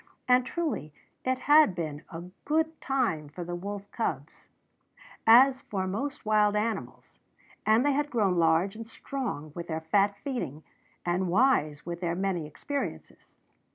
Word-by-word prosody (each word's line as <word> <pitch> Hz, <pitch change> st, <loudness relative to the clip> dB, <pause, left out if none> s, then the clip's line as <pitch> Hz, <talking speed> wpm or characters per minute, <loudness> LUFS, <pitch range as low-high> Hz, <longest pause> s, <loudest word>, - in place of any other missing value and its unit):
And 250 Hz, 0 st, +4 dB
truly 315 Hz, -, -3 dB, 0.3 s
it 260 Hz, 0 st, +1 dB
had 295 Hz, -, +5 dB
been 155 Hz, -3 st, -4 dB
a 165 Hz, +1 st, -7 dB, 0.2 s
good 320 Hz, +1 st, 0 dB
time 230 Hz, -, 0 dB
for 175 Hz, +4 st, -7 dB
the 175 Hz, +1 st, -6 dB
wolf 200 Hz, +3 st, -5 dB
cubs, -, -, -4 dB, 0.8 s
as 260 Hz, +3 st, +7 dB
for 190 Hz, -2 st, -3 dB
most 265 Hz, +10 st, -4 dB
wild 210 Hz, -1 st, +3 dB
animals; 220 Hz, +1 st, -3 dB, 0.5 s
and 220 Hz, +4 st, +4 dB
they 290 Hz, -, +4 dB
had 290 Hz, +1 st, 0 dB
grown 205 Hz, -8 st, +1 dB
large 165 Hz, +5 st, +3 dB
and 225 Hz, 0 st, -8 dB
strong 230 Hz, -, -5 dB
with 170 Hz, +1 st, -6 dB
their 160 Hz, -1 st, -3 dB
fat 200 Hz, +5 st, +2 dB
feeding, 160 Hz, -, -4 dB, 0.4 s
and 180 Hz, +2 st, 0 dB
wise 170 Hz, -, +2 dB
with 170 Hz, +1 st, -5 dB
their 170 Hz, -1 st, -1 dB
many 185 Hz, -4 st, -1 dB
experiences. 280 Hz, -, -6 dB
205 Hz, 150 wpm, -28 LUFS, 170-260 Hz, 0.8 s, as